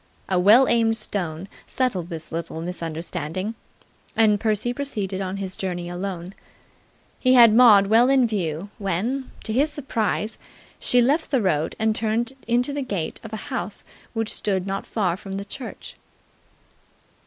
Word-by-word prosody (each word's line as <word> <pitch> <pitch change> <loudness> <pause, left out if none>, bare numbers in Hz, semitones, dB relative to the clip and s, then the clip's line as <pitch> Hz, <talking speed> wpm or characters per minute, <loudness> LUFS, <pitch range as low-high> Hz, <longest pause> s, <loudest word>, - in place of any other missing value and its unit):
A 185 -2 +1
well 220 +8 +7
aimed 225 -1 +3
stone 185 -5 -4 0.2
settled 195 -10 -1
this 165 -2 -8
little 165 -1 -4
misunderstanding, 170 +2 -4 0.6
and 215 -2 +4
Percy 220 +2 0
proceeded 205 -9 -3
on 190 0 -3
his 190 -1 -4
journey 175 -2 -4
alone. 180 0 -5 0.9
He 255 -1 +4
had 235 -3 +8
Maud 220 -4 +7
well 225 +5 +5
in 270 -2 +4
view 190 -4 -3
when, 215 +8 -1
to 220 - -2
his 290 +6 +2
surprise, 230 -6 -2 0.4
she 245 - +3
left 295 +6 +1
the 265 - +2
road 160 -7 0
and 220 0 +1
turned 230 +3 0
into 245 +4 +2
the 285 - -2
gate 195 -11 -3
of 225 - -9
a - - -4 0.2
house 185 +4 -3 0.3
which 225 -1 -2
stood 190 -3 -1
not 195 0 -4
far 185 -6 0
from 195 0 -8
the 200 - -5
church. 245 +5 -8
205 Hz, 155 wpm, -23 LUFS, 180-235 Hz, 0.9 s, had